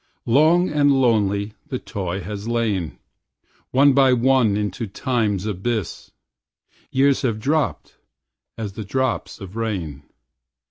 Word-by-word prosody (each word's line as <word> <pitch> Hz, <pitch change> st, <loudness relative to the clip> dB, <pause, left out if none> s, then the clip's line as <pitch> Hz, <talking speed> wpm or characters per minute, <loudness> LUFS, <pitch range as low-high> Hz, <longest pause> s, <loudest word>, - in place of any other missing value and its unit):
Long 160 Hz, +9 st, +4 dB
and 145 Hz, -1 st, +3 dB
lonely 105 Hz, -6 st, +1 dB
the 130 Hz, -, -3 dB
toy 95 Hz, -5 st, -4 dB
has 100 Hz, +3 st, -6 dB
lain. 110 Hz, -8 st, -1 dB, 0.7 s
One 140 Hz, +2 st, +5 dB
by 135 Hz, -1 st, +5 dB
one 125 Hz, -4 st, +3 dB
into 105 Hz, +2 st, -3 dB
time's 105 Hz, -3 st, -1 dB
abyss 105 Hz, 0 st, -3 dB, 0.8 s
Years 135 Hz, +1 st, +2 dB
have 115 Hz, -6 st, 0 dB
dropped 150 Hz, +6 st, -1 dB, 0.6 s
as 105 Hz, -3 st, -5 dB
the 110 Hz, -, -6 dB
drops 130 Hz, +4 st, -2 dB
of 95 Hz, -1 st, -10 dB
rain. 95 Hz, -11 st, -3 dB
115 Hz, 120 wpm, -22 LUFS, 100-130 Hz, 0.8 s, One